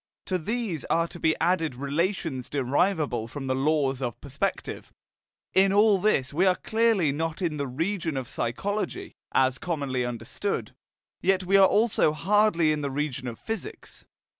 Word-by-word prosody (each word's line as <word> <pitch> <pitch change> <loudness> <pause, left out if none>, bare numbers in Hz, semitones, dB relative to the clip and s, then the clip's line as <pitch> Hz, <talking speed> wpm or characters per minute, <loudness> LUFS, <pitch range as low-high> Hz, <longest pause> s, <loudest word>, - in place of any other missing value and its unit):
To 185 -1 -1
these 210 - -2
are 165 0 +1
to 175 - -10
be 160 -1 +2
added 165 -5 +1
relations 145 0 -2
derivable 140 - 0
from 135 +3 -7
the 130 - 0
laws 135 -1 +1
of 120 -3 -3
perspective. 145 +8 -4 0.6
In 190 +1 +5
all 205 0 +5
this 160 -10 +1
we 180 +6 +3
are 185 - +4
clearly 220 -9 +2
not 160 +2 -3
in 165 -5 -1
the 140 -1 -2
region 165 +3 -2
of 130 -2 -4
psychology, 200 - -3 0.2
as 130 0 +2
commonly 140 -7 -2
understood; 120 - -3 0.5
yet 190 -1 +2
we 190 +2 +2
are 195 -1 +8
also 210 -7 +3
hardly 175 -1 +3
in 150 -1 -1
the 140 - -2
region 135 -2 -3
of 115 -2 -5
physics. 225 - -6
160 Hz, 160 wpm, -26 LUFS, 135-195 Hz, 0.6 s, are